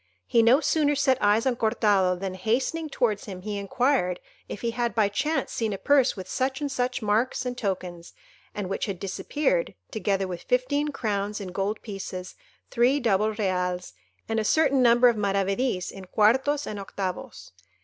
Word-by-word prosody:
He 230 - +3
no 240 +6 +5
sooner 295 -3 +2
set 270 -2 +2
eyes 210 +3 +3
on 260 -2 +2
Cortado, 200 -5 +2
than, 190 -1 -3
hastening 260 - -1
towards 220 -7 0
him, 185 -3 -8
he 205 -1 -3
inquired 200 -3 +1 0.3
if - - -6
he 235 - -1
had 235 -3 -2
by 215 -3 +3
chance 295 +9 -1
seen 220 -3 -1
a - - -3
purse 275 +3 +3
with 190 - -7
such 265 +1 -1
and 290 -2 -3
such 250 -2 -1
marks 225 +5 +1
and 250 0 -3
tokens, 185 -6 -4 0.4
and 205 -2 -3
which 195 - -2
had 195 -3 -4
disappeared, 305 - -1 0.2
together 195 -3 -1
with 180 -2 -6
fifteen 285 +4 0
crowns 210 -6 -2
in 195 -2 -6
gold 195 +4 -3
pieces, 190 -3 -6 0.4
three 250 +4 +3
double 215 -3 +1
reals, 180 - -2 0.3
and 225 0 0
a - - 0
certain 280 +2 +3
number 240 0 +6
of 235 -2 +2
maravedis 195 +1 0
in 195 -1 -10
quartos 265 +9 +2
and 210 - -5
octavos. 195 -1 -6
220 Hz, 175 wpm, -26 LUFS, 195-255 Hz, 0.4 s, number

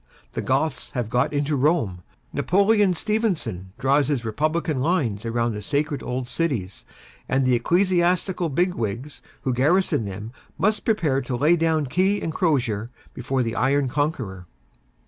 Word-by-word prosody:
The - - -2
Goths - - -1
have 115 -3 -2
got 125 - +2
into 145 0 0
Rome; 130 - +1 0.3
Napoleon 200 0 +3
Stephenson 170 - -2
draws 135 +2 +2
his 135 -6 -1
republican 155 +4 0
lines 130 - 0
round 115 0 0
the 105 - -5
sacred 145 +6 -1
old 125 0 -3
cities 125 - -3 0.4
and 135 0 +2
the 130 - +3
ecclesiastical 175 +5 +2
big 175 +5 +1
wigs 120 - -4 0.2
who 130 - 0
garrison 145 - +2
them 100 +3 -6 0.3
must 215 +1 +1
prepare 160 - +1
to 125 -1 -3
lay 150 +7 +4
down 160 -2 +1
key 190 +9 +1
and 160 - -3
crosier 125 - 0 0.2
before 125 +1 -1
the 115 -1 -3
iron 135 +2 +2
conqueror. 125 - -2
140 Hz, 145 wpm, -24 LUFS, 120-170 Hz, 0.4 s, lay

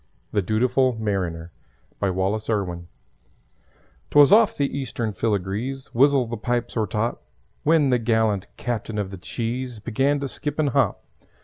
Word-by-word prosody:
THE 105 - +1
DUTIFUL 125 +6 +2
MARINER 90 -6 -2 0.5
BY 100 - +1
WALLACE 95 +4 -1
IRWIN 90 -5 -2 1.2
'Twas 145 +2 +6
off 215 +1 +5
the 140 -1 0
Eastern 120 -5 -3
Filigrees 110 +6 -2
Wizzle 135 0 +4
the 115 0 -4
pipes 120 +2 -2
o'ertop! 110 +1 -1 0.4
When 150 -3 +3
the 125 - +3
gallant 110 -4 +1
Captain 115 -2 -3
of 100 -2 -2
the 95 - -8
Cheese 120 +5 -4
Began 135 +7 0
to 140 - -2
skip 145 +2 -5
and 155 -2 +2
hop. - - +1
115 Hz, 140 wpm, -24 LUFS, 105-135 Hz, 1.2 s, Twas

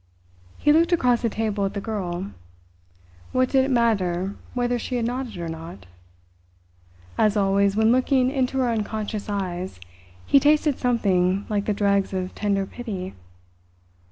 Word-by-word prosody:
He 295 - +4
looked 335 +3 +3
across 250 -8 +3
the 230 - +1
table 215 -2 -2
at 195 - -2
the - - -1
girl. 195 -3 -4 1.0
What 255 0 +2
did 265 -1 +3
it - - -3
matter 200 -6 +1 0.2
whether 245 0 0
she 250 - -4
had 235 -2 0
nodded 245 -3 -3
or 170 -1 -4
not? 160 - -8 1.3
As 215 0 +3
always 200 0 +2
when 220 +1 +4
looking 255 0 +2
into 265 -1 0
her 255 -2 +2
unconscious 215 -1 -3
eyes, 185 - -3 0.5
he 280 - +5
tasted 295 0 +3
something 195 -6 +1
like 205 -1 -1
the 210 - +1
dregs 200 -1 +1
of 185 -1 -3
tender 200 -2 0
pity. 195 -4 -6
215 Hz, 150 wpm, -24 LUFS, 195-250 Hz, 1.3 s, he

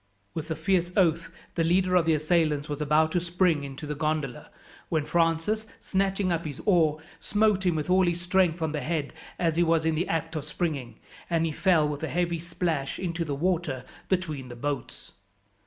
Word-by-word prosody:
With 160 0 -5
a 160 - -1
fierce 175 +2 +1
oath 170 -3 +3 0.2
the 165 - +1
leader 180 +2 +2
of 175 -3 +4
the 160 - +4
assailants 155 -2 +1
was 145 0 -4
about 155 +2 +3
to 175 - +2
spring 175 -3 +1
into 140 +2 -7
the 150 - -3
gondola, 150 -4 -2 0.4
when 155 -2 0
Francis, 170 +7 +1
snatching 195 -1 0
up 170 -1 0
his 145 -4 -6
oar, 160 -6 +4 0.2
smote 205 -2 +2
him 175 - +2
with 155 -2 -2
all 185 0 +4
his 170 0 0
strength 175 -2 +2
on 160 - 0
the 150 -1 -2
head 150 0 -2 0.2
as 165 -2 0
he 175 - +5
was 165 -1 +2
in 160 - +2
the 165 +3 -1
act 165 0 -2
of 155 - -2
springing, 145 -7 -3 0.3
and 165 -1 +2
he 160 - -1
fell 165 -1 +3
with 145 -1 -4
a 160 - -2
heavy 175 -1 0
splash 165 -4 -2
into 170 -2 -2
the 145 -3 -3
water 160 -5 -1 0.2
between 160 -8 -1
the 120 - -8
boats. 145 +3 -4
165 Hz, 200 wpm, -27 LUFS, 150-175 Hz, 0.4 s, he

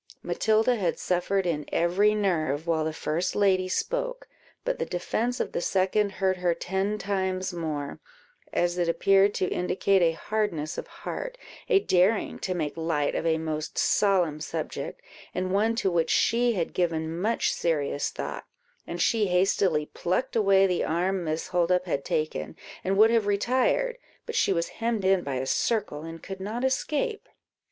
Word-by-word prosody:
Matilda 220 +3 +2
had 180 -5 0
suffered 185 +2 0
in 155 -4 -1
every 195 +5 +3
nerve 160 -7 0
while 165 -2 +1
the 160 - -1
first 160 +2 -2
lady 190 -2 +2
spoke, - - -2 0.4
but - - -1
the - - +1
defence 230 +7 -2
of - - -2
the - - -2
second 195 +2 +1
hurt 190 -1 0
her 175 -2 +1
ten 195 +4 -1
times 190 -2 -2
more, 155 -4 -4 0.5
as 175 0 0
it 170 -1 +1
appeared 195 +3 +4
to - - +1
indicate 190 +2 +1
a 165 -1 +4
hardness 175 -7 -2
of - - -7
heart, - - -6 0.3
a 435 - +6
daring 190 - +2
to 185 - -2
make 155 -4 -2
light 160 -3 0
of 165 - -1
a 160 -1 +3
most 155 -1 -4
solemn 180 -7 +2
subject, - - -5 0.3
and 185 0 -1
one 220 +3 +2
to 195 -5 0
which 170 -2 +1
she 235 +1 +3
had 175 -6 -2
given 165 -1 -1
much 225 +4 +1
serious 145 -4 0
thought, - - -6 0.4
and - - -5
she 220 -3 +2
hastily 180 -3 +2
plucked 185 +13 -2
away 195 -3 +5
the 180 -2 +1
arm 180 +3 0
Miss 155 0 -3
Holdup 180 +1 +2
had 140 -6 -2
taken, 155 - -2 0.3
and 195 +1 0
would 220 +2 +7
have 225 -3 +2
retired, 260 - +1 0.3
but 460 - -5
she - - +2
was 170 -2 0
hemmed 230 -4 0
in 190 -1 +4
by 140 -5 -4
a 130 +1 -2
circle, 205 - 0
and 165 0 -8
could 195 -1 -7
not 215 +6 -4
escape. 305 - -1
185 Hz, 170 wpm, -27 LUFS, 165-210 Hz, 0.5 s, would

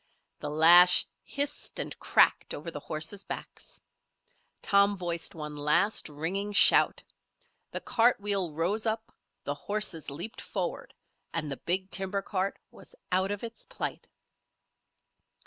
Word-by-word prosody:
The 145 - -5
lash 170 +4 +7 0.2
hissed 285 0 -3
and - - -4
cracked - - +3
over 155 +3 -7
the 145 - -7
horses' 160 +7 -4
backs. - - -8 0.8
Tom 200 0 +3
voiced 170 -2 -2
one 150 -2 -7
last, 150 +7 +1
ringing 185 +8 -3
shout. - - +5 0.7
The - - -5
cart 240 -1 +2
wheel 200 -4 +1
rose 185 +9 -1
up, 220 0 -3 0.3
the 145 - -2
horses 195 -1 -2
leaped 170 +11 -6
forward, - - -5 0.4
and 155 -3 -2
the 135 - -4
big 185 +2 -2
timber 195 +1 -1
cart 195 0 -2
was - - -14 0.2
out 190 +1 +1
of 205 +1 -4
its 230 0 -8
plight. - - -6
185 Hz, 130 wpm, -28 LUFS, 160-205 Hz, 0.8 s, lash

